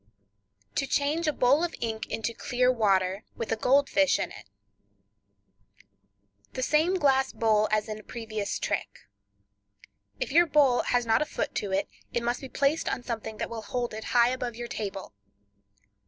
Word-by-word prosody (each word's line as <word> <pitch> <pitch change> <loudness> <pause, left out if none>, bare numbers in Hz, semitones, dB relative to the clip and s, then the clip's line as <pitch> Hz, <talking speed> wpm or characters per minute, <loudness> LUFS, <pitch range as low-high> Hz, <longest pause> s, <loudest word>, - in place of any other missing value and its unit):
To 275 - -1
Change 300 +5 0
a - - +4
Bowl 280 +3 +3
of 345 - -2
Ink 220 -1 -3
into 225 +1 -3
Clear 250 +2 +1
Water, 195 -4 +1
with 225 -1 -2
Gold 280 +2 +4
Fish 290 -1 +3
in - - -3 2.2
It.—The 255 - -2
same 315 +7 +3
glass 270 -6 +3
bowl 215 -1 +2
as 215 0 +1
in 215 0 -6
previous 220 -3 -4
trick. - - -3 1.2
If - - -2
your 340 +4 +5
bowl 285 -5 +4
has 245 -1 +1
not 225 +2 +3
a - - +2
foot - - -3
to 200 - -2
it, 195 +1 0 0.3
it 235 - -1
must 240 +1 -1
be 265 - -8
placed 280 +5 +1
on 245 - -3
something 225 -2 -5
that - - -3
will 230 -1 -5
hold 240 +1 -3
it 220 0 -6
high 240 0 +4
above 250 -2 -3
your 240 +1 -5
table. 195 - -5
240 Hz, 165 wpm, -28 LUFS, 220-275 Hz, 2.2 s, your